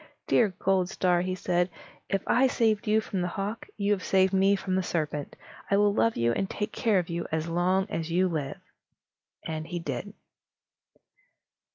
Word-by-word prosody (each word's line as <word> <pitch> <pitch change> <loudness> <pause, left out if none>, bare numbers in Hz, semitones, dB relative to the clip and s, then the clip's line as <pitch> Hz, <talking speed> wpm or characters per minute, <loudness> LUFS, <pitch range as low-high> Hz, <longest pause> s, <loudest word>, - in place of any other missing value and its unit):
"Dear 220 - +3
Goldstar," 185 -1 +1
he 185 +1 -2
said, 180 -1 0 0.4
"if 195 -1 0
I 255 +3 +4
saved 220 -3 +1
you 215 +1 +3
from 195 -3 -3
the 180 - 0
hawk, 200 +5 -4
you 200 0 0
have 200 -3 +1
saved 190 0 +3
me 195 +1 +4
from 190 -1 -3
the 190 - +2
serpent. 155 -5 -3 0.3
I 200 - +3
will 205 0 +4
love 230 +2 +2
you 115 0 +2
and 190 +11 -1
take 210 +1 -3
care 220 -5 +2
of 175 -2 0
you 170 0 -3
as 160 +1 -1
long 180 +3 +1
as 165 -4 -3
you 180 +3 +2
live." 155 -6 -3 0.9
And 155 -1 -4
so - - -15
he 175 - -3
did. 165 +5 -5
185 Hz, 185 wpm, -28 LUFS, 170-200 Hz, 0.9 s, I